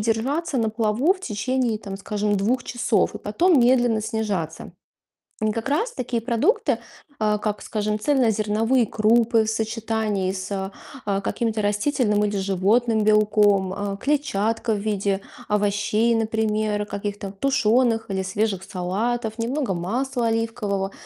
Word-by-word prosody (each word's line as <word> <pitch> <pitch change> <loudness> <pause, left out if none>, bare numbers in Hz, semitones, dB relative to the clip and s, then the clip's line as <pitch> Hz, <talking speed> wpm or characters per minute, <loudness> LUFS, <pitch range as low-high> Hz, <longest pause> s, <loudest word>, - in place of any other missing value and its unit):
держаться 260 +8 -1
на 220 -2 +1
плаву 225 - +2
в 375 - -12
течение, 235 - -1
там, 195 -3 -7
скажем, 210 +1 -1
2 235 +6 0
часов 240 -2 0
и - - -5
потом 315 - +3
медленно 240 -2 +3
снижаться. 205 -8 -3 0.7
И 215 - +2
как 230 +4 -3
раз 445 +12 0
такие 240 - -3
продукты, 265 - +1 0.4
а, 210 -1 +2
как, 210 -1 -3
скажем, 210 0 -2
цельнозерновые 225 -2 +2
крупы 225 +2 +3
в 220 - -2
сочетании 220 -3 -1
с, 190 +1 -4 0.3
а, 200 -1 0
каким-то 220 +1 -1
растительным 210 +1 +1
или 205 -1 0
животным 210 +4 +2
белком, 210 -2 +3
э, 200 0 -3
клетчатка 230 -5 0
в 210 - 0
виде 200 -1 -1 0.3
овощей, 210 +2 +1
например, 215 -1 0
каких-то 205 -1 -5
тушёных 230 0 +2
или 190 -1 -1
свежих 195 0 -1
салатов, 215 +5 -2
немного 250 -1 -1
масла 235 +8 -1
оливкового. 225 -4 -1
215 Hz, 130 wpm, -23 LUFS, 205-235 Hz, 0.7 s, потом